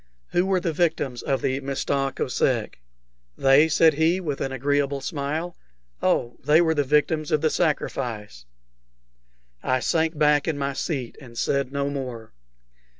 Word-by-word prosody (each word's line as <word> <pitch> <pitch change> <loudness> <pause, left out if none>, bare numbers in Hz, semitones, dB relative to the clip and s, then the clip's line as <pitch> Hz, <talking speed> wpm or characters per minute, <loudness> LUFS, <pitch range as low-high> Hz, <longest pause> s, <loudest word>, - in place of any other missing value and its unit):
"Who 180 +2 +1
were 190 -1 +2
the 170 -2 -2
victims 150 -7 0
of 135 - -1
the 130 +1 0
Mista 135 0 -1
Kosek?" - - -1 0.6
"They?" 135 +3 +5
said 160 0 +4
he, 160 +5 +2
with 150 -7 -4
an 135 - -2
agreeable 140 +1 0
smile. 150 +5 -3 0.5
"Oh, 120 0 0
they 150 +4 +5
were 165 -2 +3
the 145 -2 +1
victims 150 +2 +1
of 150 - +2
the 155 - +2
sacrifice." 115 - -2 1.2
I 130 0 +1
sank 160 +3 0
back 150 -1 +3
in 160 -3 -1
my 140 0 -2
seat, 135 -4 -4
and 120 -3 -13
said 140 +1 0
no 140 0 -1
more. 125 - -6
145 Hz, 150 wpm, -24 LUFS, 135-160 Hz, 1.2 s, They